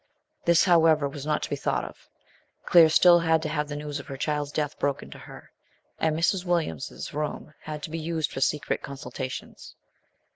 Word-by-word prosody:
This, 170 Hz, -1 st, +5 dB
however, 160 Hz, -5 st, +4 dB
was 140 Hz, +1 st, -7 dB
not 150 Hz, -, 0 dB
to -, -, -4 dB
be -, -, +1 dB
thousht -, -, -1 dB
of. -, -, -13 dB, 0.6 s
Claire 165 Hz, -2 st, +7 dB
still 175 Hz, +2 st, +6 dB
had 160 Hz, -1 st, +2 dB
to 155 Hz, -, -2 dB
have 150 Hz, -1 st, -1 dB
the 145 Hz, -, -5 dB
news 145 Hz, 0 st, -5 dB
of -, -, -11 dB
her 135 Hz, -, -6 dB
child's 145 Hz, +1 st, -2 dB
death 150 Hz, -1 st, -3 dB
broken 140 Hz, -1 st, -2 dB
to -, -, -10 dB
her, -, -, -13 dB, 0.5 s
and 160 Hz, -1 st, +1 dB
Mrs. 180 Hz, +2 st, +1 dB
Williams's 170 Hz, -, -2 dB
room 150 Hz, +1 st, -4 dB
had 150 Hz, -1 st, -6 dB
to 155 Hz, -, -6 dB
be 165 Hz, -, -3 dB
used 160 Hz, -1 st, -2 dB
for 135 Hz, -, -5 dB
secret 150 Hz, +2 st, 0 dB
consultations. 130 Hz, -1 st, -7 dB
150 Hz, 190 wpm, -26 LUFS, 145-165 Hz, 0.6 s, Claire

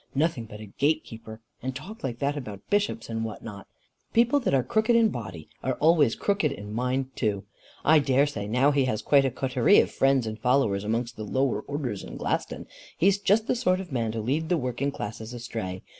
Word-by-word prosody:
Nothing 145 Hz, -5 st, 0 dB
but 105 Hz, -1 st, -10 dB
a 110 Hz, -, -8 dB
gate 145 Hz, +10 st, 0 dB
keeper, 110 Hz, 0 st, -11 dB, 0.2 s
and 130 Hz, +1 st, -4 dB
talk 190 Hz, +11 st, -9 dB
like 120 Hz, -3 st, -3 dB
that 140 Hz, +3 st, -1 dB
about 105 Hz, -8 st, -7 dB
bishops 205 Hz, -, 0 dB
and 115 Hz, -1 st, -3 dB
what 110 Hz, -2 st, -6 dB
not! 100 Hz, -3 st, -9 dB, 0.5 s
People 240 Hz, +5 st, +4 dB
that 240 Hz, -, -1 dB
are 130 Hz, -, +2 dB
crooked 220 Hz, -, +2 dB
in 230 Hz, -1 st, +5 dB
body 95 Hz, -, -7 dB
are 130 Hz, 0 st, -1 dB
always 155 Hz, -6 st, +4 dB
crooked 200 Hz, -8 st, 0 dB
in 105 Hz, -5 st, -7 dB
mind 130 Hz, +3 st, -2 dB
too. 105 Hz, -4 st, -1 dB, 0.4 s
I 155 Hz, 0 st, +6 dB
dare 135 Hz, 0 st, +3 dB
say 105 Hz, -9 st, -4 dB
now 125 Hz, +6 st, +3 dB
he 140 Hz, -2 st, +2 dB
has 110 Hz, -3 st, -2 dB
quite 140 Hz, +2 st, +4 dB
a -, -, +2 dB
coterie 130 Hz, -, +3 dB
of -, -, +2 dB
friends 135 Hz, -2 st, +2 dB
and 110 Hz, 0 st, -5 dB
followers 115 Hz, -5 st, +2 dB
amongst 115 Hz, +3 st, -2 dB
the 110 Hz, -, -5 dB
lower 130 Hz, 0 st, 0 dB
orders 130 Hz, -8 st, -4 dB
in -, -, -8 dB
Glaston. -, -, -2 dB, 0.3 s
He's 195 Hz, +4 st, +3 dB
just 205 Hz, +2 st, +3 dB
the -, -, +1 dB
sort 185 Hz, -6 st, +1 dB
of 185 Hz, -4 st, -7 dB
man 115 Hz, -4 st, -1 dB
to 115 Hz, -, -2 dB
lead 150 Hz, +8 st, -1 dB
the 175 Hz, -, +3 dB
working 125 Hz, 0 st, -2 dB
classes 110 Hz, 0 st, -6 dB
astray. 110 Hz, -6 st, -5 dB
130 Hz, 215 wpm, -26 LUFS, 110-150 Hz, 0.5 s, I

